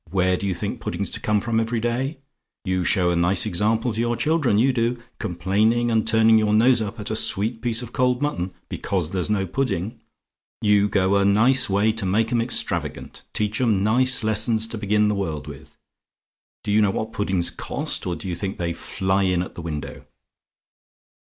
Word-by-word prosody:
Where 95 0 +1
do 100 - -3
you 95 - -1
think 85 - -4
pudding's - - -4
to - - -1
come 105 -1 +1
from 115 +1 0
every 115 +1 -1
day? 125 +6 -2 0.5
You 95 -1 0
show 90 -1 +2
a - - 0
nice 85 +2 +2
example 110 +6 0
to 110 - -4
your 120 0 0
children, 150 -7 +1
you 130 +4 +3
do; 120 0 0 0.2
complaining, 110 +5 +1
and 110 -1 +1
turning 110 0 +5
your 105 -1 +2
nose 120 +2 +4
up 110 +2 -5
at 105 - -5
a - - -1
sweet 110 +2 0
piece 120 0 0
of 120 - -10
cold 125 -1 +1
mutton, 95 -11 -2 0.2
because 90 -5 -3
there's 95 +1 -2
no 100 -2 0
pudding! 110 -1 -3 0.6
You 105 -1 +3
go 100 0 +2
a 100 - +2
nice 115 +6 +4
way 100 +3 +2
to 110 -2 -1
make 110 +4 +1
'em 120 -1 +2
extravagant 120 +1 -2
teach 105 +2 -1
'em 110 -6 +2
nice 125 +3 +2
lessons 110 +1 +1
to 115 - -4
begin 105 0 +2
the 105 - +1
world 80 -7 -3
with. 70 -2 -12 0.9
Do - - -2
you 105 +1 +4
know 105 - +3
what 110 +3 -3
puddings 95 -4 0
cost; - - -2
or 90 - -1
do 80 - -7
you 90 - -2
think 95 +3 -4
they 85 -1 -2
fly 95 +3 -1
in 90 -2 +1
at - - -9
the - - -8
window? 75 -4 -6
105 Hz, 200 wpm, -23 LUFS, 95-115 Hz, 0.9 s, turning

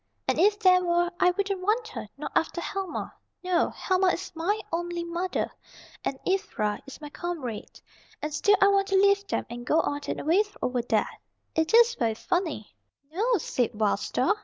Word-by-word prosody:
And - - +1
if 410 +4 +4
there 365 -3 +5
were 345 0 +2
I 360 - +5
wouldn't 390 +1 -1
want 440 +4 +1
her, 435 - -7
not 295 - -5
after 330 - +1
Helma! 385 +2 -4 0.3
No, 365 -1 +2
Helma 375 0 +1
is 360 0 -1
my 355 +6 0
only 345 0 -2
mother, 340 +2 -2 0.5
and 270 - -2
Ivra 300 - -1
is 275 - -10
my 300 -1 -8
comrade. 295 -12 -5 0.4
And 300 0 -4
still 410 +7 +4
I 395 - +7
want 395 -1 +3
to 390 - 0
leave 400 +1 +4
them, - - -1
and 240 0 -7
go 310 +6 +2
on 290 0 -2
and - - -2
away 345 +7 +3 0.2
over 250 -1 0
there. 225 -2 +1 0.5
It 320 +7 +2
is 470 0 +7
very 225 - 0
funny." 325 - -2 0.4
"No," 450 +6 +2
said 245 - -1
Wild 210 -2 +2
Star. - - +1
350 Hz, 185 wpm, -27 LUFS, 300-395 Hz, 0.5 s, I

